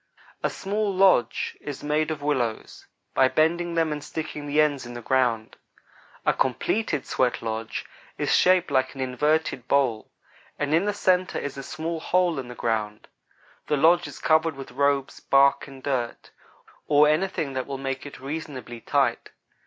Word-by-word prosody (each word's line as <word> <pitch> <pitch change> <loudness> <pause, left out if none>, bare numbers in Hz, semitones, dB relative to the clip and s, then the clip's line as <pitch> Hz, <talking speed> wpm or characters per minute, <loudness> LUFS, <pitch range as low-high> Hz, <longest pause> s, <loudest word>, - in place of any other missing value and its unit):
A - - +1
small 205 +1 -2
lodge 185 -11 +3
is 145 -2 -7
made 150 +1 +1
of 150 -2 -4
willows, 125 -7 -2 0.3
by 130 - +5
bending 170 +4 +1
them 165 -1 +1
and 150 -1 -4
sticking 150 -1 -5
the 145 +1 +1
ends 145 -3 +2
in 120 0 -9
the - - -5
ground. 120 -4 0 0.7
A - - +4
completed 145 - 0
sweatlodge 115 -3 -2 0.3
is - - 0
shaped 180 -3 +4
like 130 0 +1
an 135 - -5
inverted 130 0 0
bowl, 130 -6 +1 0.5
and 145 0 -1
in 170 +5 +3
the 205 - 0
centre 185 -2 +1
is 145 - -4
a 135 - -6
small 160 +4 -4
hole 175 -2 +1
in 130 - -6
the 125 - -9
ground. 110 -3 -2 0.6
The 150 - +1
lodge 170 +4 +4
is - - -9
covered 160 0 +2
with 135 -1 -9
robes, 140 0 0
bark, 140 +1 +3
and 135 -1 -12
dirt, 125 -4 -3 0.6
or 150 0 +5
anything 155 -2 0
that 130 -1 -3
will 140 -1 -4
make 135 0 -4
it 145 - -11
reasonably 135 -5 -6
tight. - - 0
145 Hz, 165 wpm, -25 LUFS, 130-160 Hz, 0.7 s, by